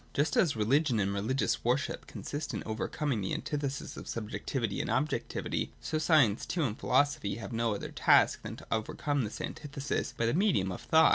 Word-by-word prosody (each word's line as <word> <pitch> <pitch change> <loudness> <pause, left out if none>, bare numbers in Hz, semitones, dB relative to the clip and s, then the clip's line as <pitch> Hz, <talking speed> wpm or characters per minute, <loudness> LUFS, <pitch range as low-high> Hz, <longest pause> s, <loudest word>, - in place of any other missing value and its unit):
Just 145 +2 +2
as 155 -7 +3
religion 125 +3 +2
and 100 0 +1
religious 110 +7 0
worship 125 +4 0
consist 145 +1 -5
in - - -3
overcom 130 +6 -2
ing 110 - -1
the 95 - -1
antithesis 140 -2 -3
of - - -8
subjectivity 115 0 -2
and - - -4
objectivity, 135 +6 -1
so 155 - -2
science 150 - +4
too 170 - 0
and 115 -6 -2
philosophy 130 -5 +2
have 115 -1 -7
no 115 -2 +1
other - - -6
task - - +4
than - - -6
to - - -13
overcome 135 +6 0
this 105 - -5
antithesis 140 -1 -3
by 115 - +1
the 115 - +2
medium 170 - +2
of - - -6
thought. 160 -1 +5
130 Hz, 190 wpm, -31 LUFS, 110-145 Hz, -, thought